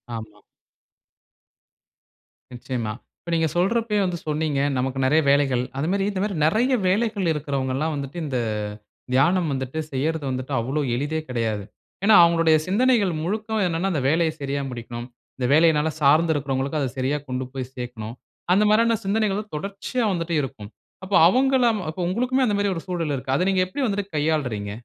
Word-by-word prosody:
ஆமா. 105 -2 -9 2.1
நிச்சயமா. 120 -3 -4 0.3
இப்ப - - -11
நீங்க 160 -1 +2
சொல்றப்பயே 210 +4 +1
வந்து 180 -1 -2
சொன்னீங்க 150 -2 0 0.2
நமக்கு 130 +1 -1
நெறைய 155 +4 +4
வேலைகள். 135 -3 +2
அது 145 +4 -1
மாரி 195 0 +1
இந்த 190 -2 -3
மாரி 205 -2 -2
நெறைய 230 +11 +2
வேலைகள் 205 -1 +1
இருக்றவங்கல்லாம் 140 0 -2
வந்துட்டு, 140 +3 -6
இந்த 130 -4 -2 0.8
தியானம் 165 +6 +3
வந்துட்டு, 130 +3 -3
செய்றது 150 +3 -1
வந்துட்டு 130 +2 -4
அவ்ளோ 135 +6 -1
எளிதே 145 +5 -1
கெடையாது. 115 -4 -1 0.4
ஏனா, 220 - +6
அவங்களுடைய 165 -1 +4
சிந்தனைகள் 215 -1 +3
முழுக்க 215 +5 -2
என்னன்னா, 170 +3 -1
அந்த 150 - 0
வேலைய 160 +1 +2
சரியா 140 0 -2
முடிக்கணும். 120 -1 -7 0.3
இந்த 125 - -1
வேலையினால 160 0 +4
சார்ந்து 155 +4 +4
இருக்றவங்களுக்கு 140 +1 -2
அத 135 - 0
சரியா 130 +3 0
கொண்டு 130 0 -3
போய் 130 -1 -5
சேர்க்கணும். 120 -3 -6 0.4
அந்த 200 +3 +4
மாரியான 230 +1 +4
சிந்தனைகள் 210 0 0
தொடர்ச்சியா 200 - -3
வந்துட்டே 170 -2 -2
இருக்கும். 110 -6 -7 0.3
அப்ப 190 +1 -6
அவுங்களாம் 250 0 +3
அப்ப 160 - -7
உங்களுக்குமே 250 +7 +1
அந்த 210 -4 +1
மாரி 200 0 +1
ஒரு 165 - -4
சூழல் 165 -5 -2
இருக்கு. 130 0 -3
அத 180 - +1
நீங்க 190 -1 +2
எப்டி 185 +10 -5
வந்துட்டு 205 -3 -1
கையாள்றீங்க? 140 -10 -1
160 Hz, 155 wpm, -23 LUFS, 130-195 Hz, 2.1 s, ஏனா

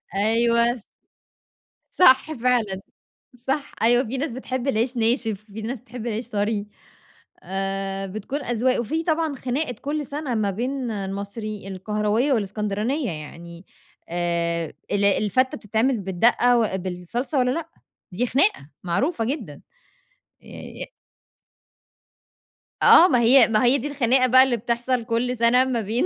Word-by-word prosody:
أيوه 235 +3 +2
ص 230 - -14 1.1
صح 265 -1 +5
فعلًا، 230 -7 0 0.7
صح، 275 +2 -1
أيوه، 240 +2 +4
في 255 +3 -4
ناس 285 +1 -2
بتحب 255 +1 -4
العيش 245 0 0
ناشف، 225 -3 0
في 220 - -6
ناس 230 +2 -5
بتحب 240 0 -8
العيش 230 +1 -4
طري 205 -1 -1 0.8
آآ، 195 +1 -3
بتكون 215 +9 -5
أذواق، 245 +1 0
وفي 310 +8 -2
طبعًا 320 -3 0
خناقة 255 +1 -3
كلّ 295 +1 -3
سَنة 280 -3 -4
ما 210 -2 0
بين 250 +4 -3
المصري 200 +1 -5
القهراوية 210 +7 0
والإسكندرانية، 210 - -2
يعني 170 +3 -10 0.4
آآ، 170 -1 -1 0.2
الع 200 -1 +2
الفتّة 255 +5 +1
بتتعمَل 225 +4 0
بالدَّقة 235 +6 +3
وأ 220 -4 0
بالصلصة 190 - -3
والّا 250 0 +2
لأ؟ 330 +3 -4 0.4
دي 235 +8 -1
خناقة 215 - +1
معروفة 225 - -1
جدًا، 225 - -5 0.8
ي - - -17 0.3
يأ - - -4 2.0
آه، 350 - +8
ما 250 -8 +2
هي 240 0 +6
ما 215 0 +2
هي 250 +3 +4
دي 280 +2 -4
الخناقة 255 -2 +2
بقى 260 +1 +7
اللي 255 -3 0
بتحصَل 240 +1 -1
كلّ 245 +2 -1
سَنة 235 +2 +4
ما 250 -3 -1
بين 220 - -1
235 Hz, 135 wpm, -23 LUFS, 200-255 Hz, 2.0 s, آه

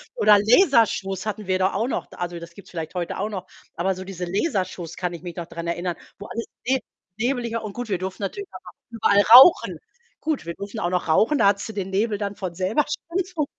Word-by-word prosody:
Oder 210 - +6
Lasershows 215 - +3
hatten 210 -2 -4
wir 185 0 +2
da 190 +1 +2
auch 225 +5 0
noch. - - -3
Also, 175 -1 -4
das 170 0 -11
gibt's 200 - -14
vielleicht 165 -1 -5
heute 175 -1 -3
auch 210 +3 -2
noch, 190 -4 -6 0.3
aber 185 +3 0
so 185 - -7
diese 185 -2 -6
Lasershows 185 - -2
kann 180 -2 -3
ich 170 +1 -9
mich 175 -2 -7
noch 170 - -5
dran 170 0 -7
erinnern, 175 0 -2 0.2
wo 205 - -8
alles 230 0 -4 0.2
ne 265 0 +3 0.4
nebeliger 235 -1 -1
und 205 -2 -6
gut, 245 -2 -6
wir 190 - +1
durften 190 +2 -5
natürlich 405 - -4
auch - - -11 0.2
überall 205 -3 +3
rauchen. 265 +8 +9 0.4
Gut, 305 - -2
wir 170 - -4
durften 200 +2 -7
auch 175 - 0
noch 180 -2 -1
rauchen, 225 - +3
da 200 - +4
hattest 200 +2 +1
du - - -6
den 195 -2 -4
Nebel 210 +2 0
dann 200 -1 -4
von 180 -3 -5
selber 195 - +1
schon 340 -1 -2
200 Hz, 225 wpm, -23 LUFS, 180-230 Hz, 0.4 s, rauchen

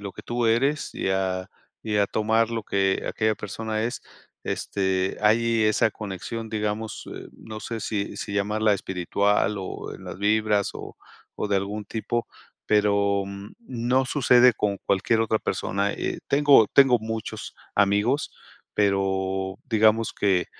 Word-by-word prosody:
lo 100 -2 -6
que - - -11
tú 120 -1 -1
eres 135 +7 +1
y - - -2
a 95 0 -1 0.3
y 105 -2 -1
a 100 -1 +3
tomar 110 +2 +1
lo 115 -2 -2
que 95 -1 0
aquella 110 -1 0
persona 110 +2 -4
es, 120 +3 -3 0.4
este, 95 -1 -1
hay 115 +1 +3
esa 110 +1 +3
conexión, 110 +3 -6
digamos, 105 0 -3
eh, - - -8
no 110 -1 -9
sé, 115 -1 -5
si 105 -2 -3
si 100 - -5
llamarla 105 +1 +1
espiritual, 100 +3 0
o 95 - -6
en - - -12
las - - -7
vibras 105 0 +2
o - - -9 0.4
o 105 - -2
de 100 - +2
algún 100 +2 -3
tipo, 115 +2 -3 0.4
pero, 100 -1 +2
mm, 100 +1 -9
no 125 +2 +1
sucede 125 -3 +5
con 100 -2 -1
cualquier 105 +3 +2
otra 110 0 +1
persona, 100 0 -1
eh, - - -3
tengo 140 -6 +6
tengo 135 -3 +5
muchos 110 0 -5 0.2
amigos, 105 +8 +2 0.4
pero, 95 -1 0
digamos 110 0 +3
que, 95 -3 +2
105 Hz, 150 wpm, -25 LUFS, 100-115 Hz, 0.4 s, tengo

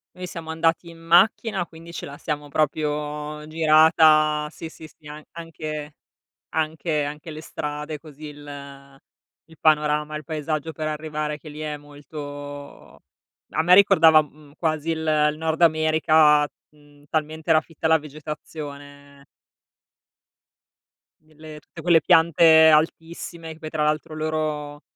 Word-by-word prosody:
Noi 180 0 -7
siamo 165 -2 -8
andati 165 +1 0
in 165 0 -14
macchina, 185 +3 +3
quindi 165 0 -13
ce - - -6
la 140 +1 -10
siamo 150 -2 -5
proprio 150 0 -2
girata, 155 -1 +4
sì, 165 - -8
sì, 160 0 -13
sì, 155 0 -19
an 150 +1 -9
anche 155 -2 -7 0.6
anche 155 -1 -1
anche 150 +2 -7
le 155 - -8
strade 150 0 -5
così 150 0 -13
il 150 -1 -9 1.1
il 160 - -17
panorama, 150 0 +1
il 155 - -11
paesaggio 155 +1 -3
per 155 +1 -4
arrivare 150 0 -4
che 155 - -15
lì 150 0 -9
è 150 -1 -4
molto 145 - -10 0.5
a 160 - +1
me 180 - +5
ricordava, 165 -5 +7
mhmm, 150 0 -15
quasi 155 -1 -1
il 160 - -2 0.3
il 150 - -10
nord 160 +1 -2
America, 155 -2 +4 0.3
mhmm, 145 -1 -22
talmente 155 +1 -3
era 155 -1 +5
fitta 160 0 -4
la 160 0 +5
vegetazione. 145 -2 -10 2.0
G 155 0 -25
le 155 -1 -10
tutte - - -13
quelle 170 -2 +5
piante 160 -2 +6
altissime 165 +1 -1
che 160 - -18
poi 155 - -7
tra 155 -1 -1
l'altro 155 +1 -1
loro 155 -2 -3
155 Hz, 140 wpm, -23 LUFS, 150-160 Hz, 2.0 s, ricordava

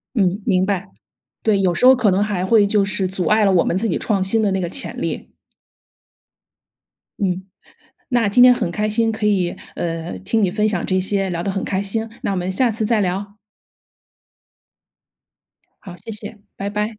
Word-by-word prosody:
嗯， 195 -2 +1
明 185 0 +2
白。 195 - -2 0.5
对， 215 -3 +2
有 185 -2 +2
时 245 - 0
候 260 +1 +9
可 230 -5 +2
能 190 +2 +2
还 205 -3 -1
会 215 -1 +4
就 205 0 +2
是 195 -1 -1
阻 185 -1 -3
碍 215 +3 +3
了 200 - +4
我 175 -3 +3
们 - - -1
自 225 +4 0
己 - - -1
创 200 -4 0
新 195 +4 +2
的 205 - +2
那 190 - -1
个 175 - -2
潜 260 +10 -2
力。 - - -4 1.9
嗯， 185 -2 -1 0.7
那 240 -4 +2
今 225 +5 +5
天 250 0 +8
很 175 - -2
开 210 +4 -1
心 225 +1 +1
可 220 -1 -2
以， 185 -4 +1 0.2
呃， 165 - -4
听 155 - -1
你 200 - +3
分 210 +3 +1
享 195 -5 -2
这 185 0 +1
些。 195 +1 0
聊 170 -2 -3
得 195 - -2
很 195 0 -3
开 190 0 -1
心， 220 +3 -2
那 - - -1
我 195 - -1
们 180 +1 -2
下 240 +6 +1
次 220 0 -2
再 225 -1 +2
聊。 195 +2 -3 2.5
好， 180 -4 -10
谢 195 +6 -10
谢。 215 0 -4 0.2
拜 200 - -4
拜。 210 +1 -3
200 Hz, 210 characters per minute, -20 LUFS, 185-215 Hz, 2.5 s, 候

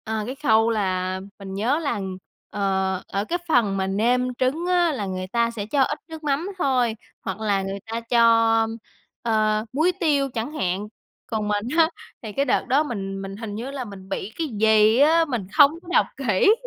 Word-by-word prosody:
À, 220 -1 -2
cái 255 +4 -5
khâu 225 -5 +3
là 185 -3 -1 0.2
mình 195 -1 -7
nhớ 235 +10 +1
là, 285 -9 -2 0.5
ờ, 190 -2 -1
ở 200 +1 -2
cái 350 +9 -2
phần 230 -10 +2
mà 190 0 0
nêm 245 +6 +1
trứng 265 +8 0
á 355 -2 +3
là 210 -7 -3
người 185 -1 -4
ta 235 +3 +1
sẽ 215 -3 -5
cho 275 +6 +1
ít 280 +3 +1
nước 320 -1 -9
mắm 295 +5 -1
thôi, 255 -8 +1 0.3
hoặc 190 -1 -5
là 205 -3 +1
người 195 +1 -4
ta 225 +1 -3
cho, 230 -1 +5 0.6
ờ, 215 -2 +1
muối 315 +6 +3
tiêu 290 -6 +2
chẳng 230 +5 -3
hạn. 190 - -2 0.4
Còn 215 -2 -2
mình 205 +1 -1
á 325 -1 +5 0.3
thì 220 - -6
cái 275 +6 0
đợt 255 - +1
đó 275 +4 +3
mình 195 -8 -4
mình 195 0 -6
hình 215 -2 -6
như 240 +5 -5
là 275 -2 -4
mình 195 -3 -11
bị 195 +1 -4
cái 325 - -1
gì 220 -1 +4
á, 325 +3 +5
mình 240 -10 -3
không 290 -2 +7
có 365 - -19
đọc - - +5
kỹ, 265 - +4
225 Hz, 200 wpm, -23 LUFS, 200-275 Hz, 0.6 s, không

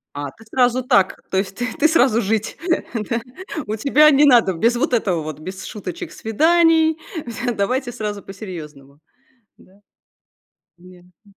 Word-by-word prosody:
А, 145 -1 -5
ты 225 - -19
сразу 250 +2 +1
так? 195 -6 +2
То 190 - -1
есть 190 0 -2
ты 245 +2 -3
ты 315 - +4
сразу 255 -7 +3
жить, 220 +1 -2 0.5
да? 235 -1 -1 0.5
У 215 - -2
тебя 285 +7 +5
не 285 +1 +5
надо, 240 -8 +5
без 230 +8 +1
вот 255 +2 -1
этого 190 -8 +1
вот, 155 -1 -7
без 185 +4 -8
шуточек, 190 -4 -7
свиданий. 320 +6 +3 0.3
Всё, 240 +1 -3
давайте 245 +5 -1
сразу 210 -3 -5
по 195 - -10
серьезному. 150 -8 -10 0.6
Да? - - -21 1.1
Ясно. 180 +1 -19
220 Hz, 155 wpm, -20 LUFS, 185-255 Hz, 1.1 s, тебя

